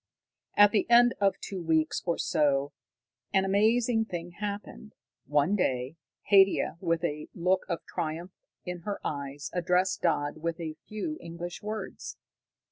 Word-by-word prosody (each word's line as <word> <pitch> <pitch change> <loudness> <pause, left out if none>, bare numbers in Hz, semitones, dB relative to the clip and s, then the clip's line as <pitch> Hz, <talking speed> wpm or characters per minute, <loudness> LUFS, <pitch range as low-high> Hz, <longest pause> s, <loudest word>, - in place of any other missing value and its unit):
At 205 0 +8
the 215 - +1
end 240 0 +7
of 195 -1 +2
two 190 -2 -5
weeks 160 -1 +1
or 170 - +1
so, 140 -1 +1 0.6
an 195 0 +3
amazing 225 +3 +3
thing 175 -4 -6
happened. 210 +1 -6 0.3
One 150 +7 +2
day 130 -6 -1 0.4
Haidia, 195 -3 +5
with 165 -2 0
a 150 -2 -2
look 185 +2 +1
of 170 - -3
triumph 165 +3 -4 0.3
in 180 -1 -4
her 200 +4 -4
eyes, 140 -1 -4
addressed 180 +1 +1
Dodd 145 -4 0
with 165 +1 -3
a 155 -2 -5
few 260 +9 -4
English 170 +1 -7
words! 210 -1 -6
175 Hz, 140 wpm, -29 LUFS, 160-205 Hz, 0.6 s, At